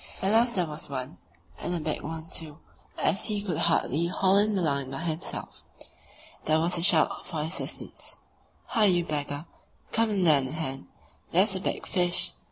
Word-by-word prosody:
at 190 - +1
last 235 +2 +3
there 180 -2 +2
was 155 -1 -7
one, 130 -9 -6 0.4
and 175 - -3
a - - -2
big 155 -1 -3
one, 160 0 -6
too, 155 -2 -5 0.4
as 195 - +2
he 210 -1 -1
could 180 -7 -2
hardly 165 -1 +2
haul 190 +2 +2
in 210 0 +1
the 190 - 0
line 140 -4 0
by 135 - -5
himself. 165 -1 -4 0.8
There 155 0 +2
was 170 +2 0
a - - -1
shout 165 -3 +4
for 160 -4 -4
assistance. 160 +4 -3 0.5
"Hi, 220 -3 +2
you 175 -3 +2
beggar! 145 -1 -4 0.5
come 230 0 +1
and 200 -3 0
lend 145 -6 +5
a 130 - -7
hand; 135 -4 -5 0.4
there's 190 +3 +5
a 185 - -2
big - - -3
fish!" 175 -1 +4
165 Hz, 180 wpm, -27 LUFS, 150-190 Hz, 0.8 s, lend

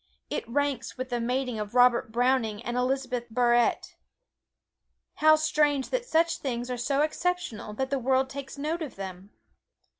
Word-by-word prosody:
It - - -3
ranks 285 -1 -1
with 255 0 -4
the 240 -1 -1
mating 250 -1 -1
of 210 +2 -5
Robert 245 -2 +4
Browning 235 -3 +1
and 240 0 -3
Elizabeth 250 -1 -1
Barrett. 240 0 +2 1.2
How 310 0 +6
strange 300 -3 +1
that - - -1
such 335 -3 +2
things 245 -2 -3
are - - -1
so 275 +4 0
exceptional 330 -9 -2
that 265 +4 -2
the 275 - +1
world 260 +1 +2
takes 275 +1 -8
note 310 +4 -2
of 305 - -5
them! 190 0 -8
260 Hz, 155 wpm, -27 LUFS, 240-285 Hz, 1.2 s, How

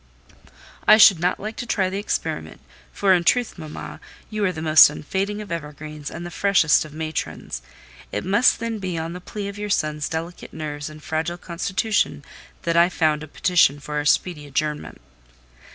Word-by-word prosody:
"I 215 - +9
should 200 -5 +8
not 180 +2 0
like 215 +2 -6
to 245 - -5
try 195 -5 +1
the 195 - -2
experiment; 205 - -3 0.3
for, 195 -2 +3
in 175 -2 +2
truth, 240 +1 +1
mamma, 155 -1 -8 0.3
you 215 -1 -2
are 185 - +2
the 160 - -7
most 155 -1 +8
unfading 195 +8 -3
of 200 - -12
evergreens 150 -2 -6
and 170 +1 -7
the 175 - -7
freshest 180 -3 +3
of 155 - -11
matrons. 155 - -5 0.5
It - - -3
must 205 +6 +4
then 230 -1 -3
be 185 -3 -3
on 165 +1 -4
the 180 - -8
plea 200 +2 -6
of 200 0 -7
your 210 0 -4
son's 150 -5 0
delicate 165 +2 -6
nerves 150 -1 -5
and 155 0 -13
fragile 160 +2 -2
constitution 180 -3 -1 0.4
that 170 0 0
I 170 +1 +5
found 155 -4 +1
a 155 - -8
petition 160 -3 +3
for 150 +1 -5
our 145 - -1
speedy 150 -1 +1
adjournment." 150 +2 -3
170 Hz, 185 wpm, -23 LUFS, 155-195 Hz, 0.5 s, I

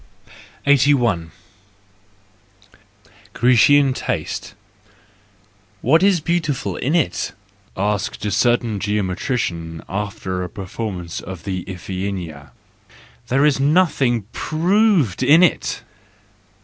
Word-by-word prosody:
8i. 125 - +3 2.0
Grecian 130 +3 +4
Taste - - -4 1.3
,.—"What 160 +7 +4
is 195 -2 +4
beautiful 150 - -1
in 145 - -1
it?"— 90 - 0 0.4
asked 100 +1 -2
a 105 - -1
certain 120 0 +1
geometrician, 95 - -2
after 95 -2 -4
a 90 - -4
performance 95 -3 -5
of 90 -2 -8
the 95 -2 -3
Iphigenia 90 -5 -5 0.4
—" 60 0 -25
there 135 +3 +2
is 145 -3 +3
nothing 140 - +2
proved 175 - +1
in 160 +5 +6
it! 180 - +1
110 Hz, 90 wpm, -20 LUFS, 95-145 Hz, 2.0 s, in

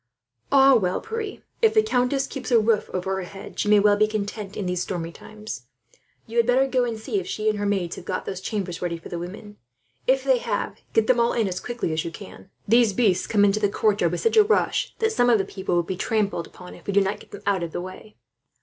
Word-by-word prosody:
"Ah 275 0 +7
well, 185 -7 +2
Pierre, 450 -2 -5 0.2
if 445 -1 +4
the 435 - +6
countess 270 - +1
keeps 270 -1 -6
a 240 - +5
roof 220 -1 +1
over 190 +1 -2
her - - -2
head 195 +2 -9
she - - 0
may 210 - +7
be - - +5
well 205 -1 +4
content, 205 -1 -4
in 205 - -3
these 180 0 -1
stormy 170 -3 -3
times. 210 - -9 0.6
You 230 - -6
had 235 0 +4
better 255 +2 +4
go 255 -2 +1
and 230 -2 -3
see 390 - -2
if 380 - -7
she 215 - -3
and 210 - -5
her 205 - -1
maids 190 -4 -1
have - - -9
got 185 - -3
those 190 -1 -5
chambers 190 -5 -4
ready 175 -1 -2
for 165 - -11
the 175 - -4
women. 205 +4 -8 0.5
If - - +3
they - - +3
have, - - -3
get 225 - +3
them 245 +1 +3
all 235 0 +3
in 225 -3 +1
as 185 -1 -3
quickly 240 -9 -3
as 155 - -1
you - - -4
can. 190 +2 -12 0.2
These 230 -1 +4
beasts 190 -4 +2
come 205 -2 +4
into 205 +1 +2
the 205 -1 +2
courtyard 200 -5 +1
with 175 - -3
such 455 - +2
a 430 - +9
rush 430 +1 +1
that 445 0 +1
some 245 - +3
of 235 - +6
the 195 - -1
people 190 -2 -3
will 175 - +2
be 185 +2 -4
trampled 200 -4 -1
upon, 180 0 -12
if - - -15
we 200 - -1
do 200 - +5
not 195 +2 -1
get - - -16
them 205 - -10
out 200 -2 +1
of 170 -1 -4
the - - -4
way." 185 +3 -10
210 Hz, 260 wpm, -24 LUFS, 185-245 Hz, 0.6 s, a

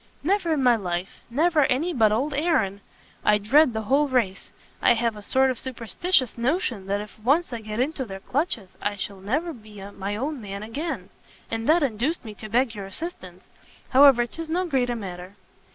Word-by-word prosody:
"Never 365 +1 +1
in 285 -4 0
my 245 -2 +6
life: 180 -3 -4
never 310 +5 +3
any 295 +8 0
but 220 -6 +4
old 270 +7 0
Aaron. 275 - +1 0.4
I 210 - +5
dread 260 +8 +4
the 220 0 -2
whole 275 +6 +3
race; 230 -8 -1 0.3
I 240 - +5
have 230 -1 0
a 210 - -9
sort 265 +5 +3
of 250 - -1
superstitious 260 - 0
notion 240 - -1
that 200 +1 0
if 210 +1 -11
once 280 +7 +2
I 235 - -4
get 215 +1 -5
into 275 +1 0
their 195 -5 -7
clutches, 240 - -2
I 205 0 -1
shall 200 0 -5
never 300 - -1
be 215 -4 -13
my 200 +1 -4
own 275 +4 -3
man 200 0 -6
again; 290 +10 -4 0.4
and 225 +2 -2
that 330 0 +5
induced 265 +5 -1
me 215 - -7
to 215 +1 -9
beg 240 +1 +2
your 200 -3 -6
assistance. 190 - -7 0.5
However, 265 -2 +7
'tis 330 +6 -7
no 360 +3 0
great 265 -7 +1
matter." 185 -2 -7
240 Hz, 190 wpm, -25 LUFS, 210-295 Hz, 0.5 s, However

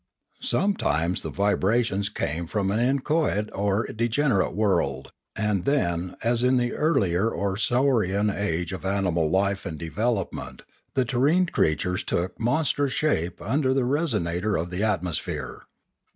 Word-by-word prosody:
Sometimes 90 - 0
the - - -4
vibrations 100 0 +1
came 85 -4 -3
from 100 +1 -1
an 105 - +1
in 130 +3 +2
choate 150 -9 0
or 100 +2 +1
a - - -7
degenerate 115 - +1
world; 95 -11 0 0.2
and 105 -4 0
then, 90 -11 0
as 115 0 +1
in 125 +1 +3
the 120 -1 0
earlier 105 - +2
or 100 -3 -2
saurian 110 -3 +2
stage 90 -4 -2
of 95 - -6
animal 95 -5 +1
life 100 +2 +1
and 80 - -5
development, 100 +5 -3 0.3
the 130 - +2
terrene 140 +9 +3
creatures 90 +5 +1
took 90 +1 -2
monstrous 140 +2 +1
shape 90 - 0
under 130 +3 +1
the 130 -2 +2
re 140 +4 +1
sonator 105 - 0
of 85 +2 -4
the 90 +2 -3
atmosphere. 90 -6 -2
100 Hz, 145 wpm, -25 LUFS, 90-125 Hz, 0.3 s, in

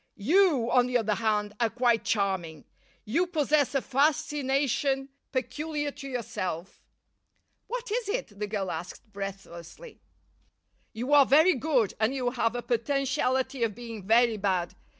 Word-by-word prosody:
You, 285 - +3
on 250 0 +4
the 250 0 +2
other 220 -2 0
hand, 210 -1 0
are 230 -2 +2
quite 235 -1 +1
charming. 190 -8 -1 0.4
You 320 +12 +1
possess 300 -4 +1
a 275 - +1
fascination 275 -1 +1 0.2
peculiar 295 +3 -3
to 275 - -9
yourself." 210 -9 -5 0.9
"What - - -5
is 455 -2 -1
it?" 405 - -4
the 210 - -2
girl 200 -3 -3
asked 175 +6 -8
breathlessly. 195 - -8 0.9
"You 245 +6 -3
are 285 -3 +7
very 315 +7 +6
good, 255 -6 +1
and 220 +5 +1
you 250 -2 -1
have 235 -2 0
a 240 - -3
potentiality 260 +1 0
of 220 -3 -1
being 230 -2 -8
very 230 0 +4
bad. 190 -3 -1
245 Hz, 140 wpm, -28 LUFS, 210-280 Hz, 0.9 s, are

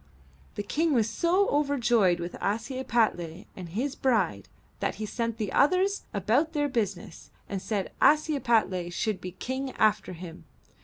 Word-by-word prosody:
The 205 - -3
King 315 +8 +1
was 225 -3 +3
so 350 - +2
overjoyed 240 -11 +2
with 175 +1 -5
Ashiepattle 220 - -1
and 180 -3 -8
his 250 - -2
bride 200 - 0 0.3
that - - -1
he 215 - -4
sent 230 +1 -3
the 210 -4 -3
others 370 +7 +3
about 240 - +1
their 290 -2 +1
business, 210 - -3 0.2
and 195 -2 -4
said 200 -3 -2
Ashiepattle 235 - +3
should 210 +3 -2
be 180 -1 -6
King 260 +6 -4
after 210 -3 +1
him. 170 -1 -10
220 Hz, 145 wpm, -28 LUFS, 185-275 Hz, 0.3 s, was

